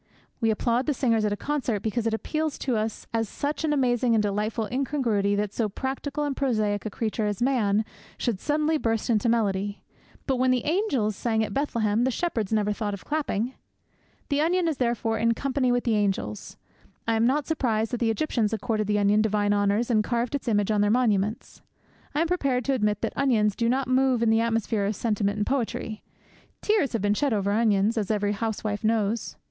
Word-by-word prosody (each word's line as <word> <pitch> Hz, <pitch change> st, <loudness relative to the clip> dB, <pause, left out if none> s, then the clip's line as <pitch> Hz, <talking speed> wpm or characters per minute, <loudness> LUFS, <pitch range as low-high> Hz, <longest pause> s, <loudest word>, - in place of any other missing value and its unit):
We 225 Hz, -, +2 dB
applaud 235 Hz, +4 st, +1 dB
the 295 Hz, -, +1 dB
singers 230 Hz, -4 st, +2 dB
at 210 Hz, -, 0 dB
a 205 Hz, -, -1 dB
concert 260 Hz, -8 st, -2 dB
because 225 Hz, +1 st, -1 dB
it 225 Hz, -, 0 dB
appeals 310 Hz, +5 st, -2 dB
to 255 Hz, -3 st, -1 dB
us 215 Hz, 0 st, -2 dB
as 225 Hz, -2 st, 0 dB
such 290 Hz, +3 st, -3 dB
an 310 Hz, -, +1 dB
amazing 245 Hz, -4 st, +2 dB
and 215 Hz, -, +3 dB
delightful 210 Hz, +2 st, -1 dB
incongruity 240 Hz, -7 st, 0 dB
that 205 Hz, 0 st, -1 dB
so 225 Hz, -3 st, 0 dB
practical 270 Hz, +6 st, -3 dB
and 285 Hz, -2 st, -1 dB
prosaic 215 Hz, -6 st, 0 dB
a -, -, -3 dB
creature 215 Hz, 0 st, -2 dB
as 205 Hz, -2 st, -2 dB
Man 220 Hz, -5 st, +2 dB, 0.3 s
should 225 Hz, -6 st, -1 dB
suddenly 305 Hz, +3 st, +1 dB
burst 225 Hz, 0 st, 0 dB
into 230 Hz, +1 st, +2 dB
melody; 205 Hz, -3 st, 0 dB, 0.4 s
but 265 Hz, -2 st, 0 dB
when 255 Hz, +1 st, +2 dB
the 255 Hz, -2 st, +1 dB
angels 290 Hz, -, 0 dB
sang 220 Hz, 0 st, 0 dB
at -, -, -4 dB
Bethlehem 230 Hz, -6 st, 0 dB
the 260 Hz, -, +2 dB
shepherds 235 Hz, -, -2 dB
never 210 Hz, -1 st, +1 dB
thought 205 Hz, -1 st, -3 dB
of 195 Hz, -, -14 dB
clapping. 265 Hz, -6 st, -1 dB, 0.8 s
The 285 Hz, 0 st, +1 dB
onion 345 Hz, +2 st, +2 dB
is 315 Hz, -4 st, -1 dB
therefore 230 Hz, -2 st, 0 dB
in 230 Hz, +1 st, +2 dB
company 265 Hz, 0 st, 0 dB
with 245 Hz, 0 st, +1 dB
the 235 Hz, -, +1 dB
angels. 195 Hz, -, -2 dB, 0.5 s
I 230 Hz, -, +2 dB
am 225 Hz, +1 st, +3 dB
not 285 Hz, +3 st, +1 dB
surprised 225 Hz, -8 st, 0 dB
that 245 Hz, -, -2 dB
the 230 Hz, -, +1 dB
Egyptians 225 Hz, -2 st, 0 dB
accorded 215 Hz, -1 st, -1 dB
the 210 Hz, 0 st, +1 dB
onion 205 Hz, +1 st, +3 dB
divine 205 Hz, -1 st, +1 dB
honours 205 Hz, +4 st, +1 dB
and 215 Hz, -2 st, +3 dB
carved 235 Hz, +2 st, -1 dB
its 280 Hz, -3 st, -3 dB
image 205 Hz, -2 st, +2 dB
on 210 Hz, -1 st, +2 dB
their 205 Hz, -, +3 dB
monuments. 215 Hz, -3 st, 0 dB, 0.5 s
I 300 Hz, -, +2 dB
am 335 Hz, -, +2 dB
prepared 275 Hz, -8 st, 0 dB
to 275 Hz, -, +1 dB
admit 210 Hz, -4 st, 0 dB
that -, -, -2 dB
onions 220 Hz, -7 st, +2 dB
do 230 Hz, 0 st, +1 dB
not 265 Hz, +1 st, 0 dB
move 255 Hz, -2 st, +2 dB
in 225 Hz, -, +3 dB
the 225 Hz, 0 st, +3 dB
atmosphere 225 Hz, -2 st, 0 dB
of 210 Hz, -, -1 dB
sentiment 210 Hz, -2 st, 0 dB
and 210 Hz, -, -1 dB
of -, -, -2 dB
poetry. 225 Hz, -4 st, -2 dB, 0.6 s
Tears 420 Hz, -12 st, +2 dB
have 225 Hz, -4 st, -1 dB
been 205 Hz, 0 st, +3 dB
shed 275 Hz, +4 st, +1 dB
over 200 Hz, -1 st, 0 dB
onions, 215 Hz, 0 st, +2 dB
as 205 Hz, -, -3 dB
every 205 Hz, -1 st, +1 dB
housewife 210 Hz, 0 st, -3 dB
knows. 220 Hz, 0 st, 0 dB
225 Hz, 205 wpm, -26 LUFS, 210-260 Hz, 0.8 s, and